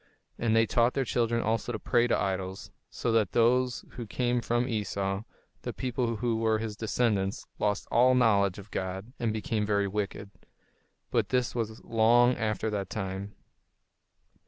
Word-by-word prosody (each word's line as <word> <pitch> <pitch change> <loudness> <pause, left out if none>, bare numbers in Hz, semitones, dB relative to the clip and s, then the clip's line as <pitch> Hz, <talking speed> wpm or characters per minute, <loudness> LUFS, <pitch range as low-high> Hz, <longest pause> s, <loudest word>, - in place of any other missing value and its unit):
And 115 -1 +2
they 115 0 +5
taught 120 +2 +2
their 135 - +1
children 115 0 0
also 115 +2 0
to 115 - -2
pray 120 +2 +2
to 120 - +2
idols; 95 0 -3 0.2
so 120 - -2
that 110 -5 +2
those 125 +2 +2
who 120 -3 -7
came 120 +2 0
from 120 +1 0
Esau, 100 -4 -2 0.4
the - - -4
people 120 -2 -1
who 115 0 0
were 110 -1 +2
his 110 -1 -4
descendants, 105 -3 0
lost 105 0 0
all 125 +2 +5
knowledge 100 -6 +3
of 100 0 -11
God, 95 +5 -4
and 115 -2 0
became 110 0 -1
very 100 -1 +1
wicked. 100 0 -4 0.8
But - - +1
this 125 -1 +1
was 110 -2 -4
long 120 +2 +4
after 110 -1 -1
that 100 -3 -3
time. 95 0 -5
110 Hz, 160 wpm, -29 LUFS, 100-120 Hz, 0.8 s, they